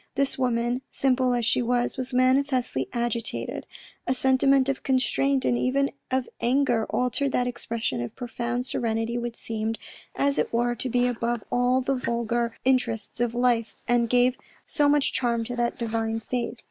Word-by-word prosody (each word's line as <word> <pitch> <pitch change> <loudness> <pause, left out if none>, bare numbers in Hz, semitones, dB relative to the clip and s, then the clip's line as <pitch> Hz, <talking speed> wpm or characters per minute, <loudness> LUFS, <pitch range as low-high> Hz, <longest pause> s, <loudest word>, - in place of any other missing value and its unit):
This 275 0 +1
woman, 245 -1 0
simple 255 -2 +2
as 240 -2 0
she 240 - +2
was, 245 0 0
was 260 0 -4
manifestly 255 - +2
agitated; 235 -1 -2 0.4
a 255 - +2
sentiment 265 +1 +3
of 275 -1 -1
constraint, 265 +1 +1
and - - +2
even 275 +2 +1 0.2
of 260 -1 0
anger, 240 -3 +2
altered 255 +2 0
that 245 - +2
expression 230 - -2
of 120 - -6
profound 240 +1 -3
serenity 230 -1 -1
which 240 -1 -4
seemed, 225 0 -2 0.4
as 280 0 +1
it - - 0
were, 240 +1 +1
to 245 +2 -3
be 245 +1 +2
above 240 -1 -1
all 245 +1 +2
the 270 +2 0
vulgar 235 -2 -1
interests 235 -5 0
of 240 -1 0
life 240 -2 +1
and 235 -1 +2
gave 250 +1 +4 0.3
so 295 -3 +2
much 290 -1 +3
charm 235 -2 +1
to 245 +2 -4
that 240 0 -1
divine 225 -1 -1
face. 240 +1 -3
245 Hz, 165 wpm, -26 LUFS, 235-260 Hz, 0.4 s, gave